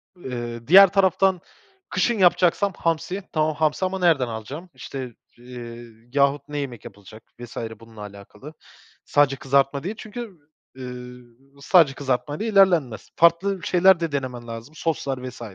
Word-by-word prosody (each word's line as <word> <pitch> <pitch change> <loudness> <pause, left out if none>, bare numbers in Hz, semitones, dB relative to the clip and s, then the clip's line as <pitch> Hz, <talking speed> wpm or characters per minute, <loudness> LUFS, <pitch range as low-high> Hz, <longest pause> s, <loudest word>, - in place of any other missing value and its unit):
Eee, 120 -7 -7
diğer 195 +5 +9
taraftan 190 -2 +2 0.5
kışın 235 -2 0
yapacaksam 185 +2 +3
hamsi. 170 +4 -2
Tamam, 155 -1 +1
hamsi 155 +4 0
ama 190 +1 -3
nereden 160 -8 +3
alacağım 130 +11 -7
işte, 130 -4 -8 0.2
eee, 120 -1 -10 0.3
yahut 140 0 +2
ne 145 0 -6
yemek 125 -6 -5
yapılacak 105 +2 -13 0.2
vs. 120 -1 -10 0.2
bununla 115 -2 -14
alakalı. 105 +8 -11 0.5
Sadece 145 -2 +3
kızartma 140 0 +1
değil 205 +5 -4
çünkü, 215 -3 -8 0.4
ııı, 125 -1 -9 0.4
sadece 160 -3 +4
kızartma 140 +1 -2
ile 220 +7 -4
ilerlenmez. 175 - +2
Farklı 180 +4 +3
şeyler 185 0 +4
de 165 -3 -2
denemen 125 -4 -4
lazım 115 +6 -9
soslar 140 -3 -2
vs. 125 - -14
145 Hz, 140 wpm, -23 LUFS, 125-180 Hz, 0.5 s, diğer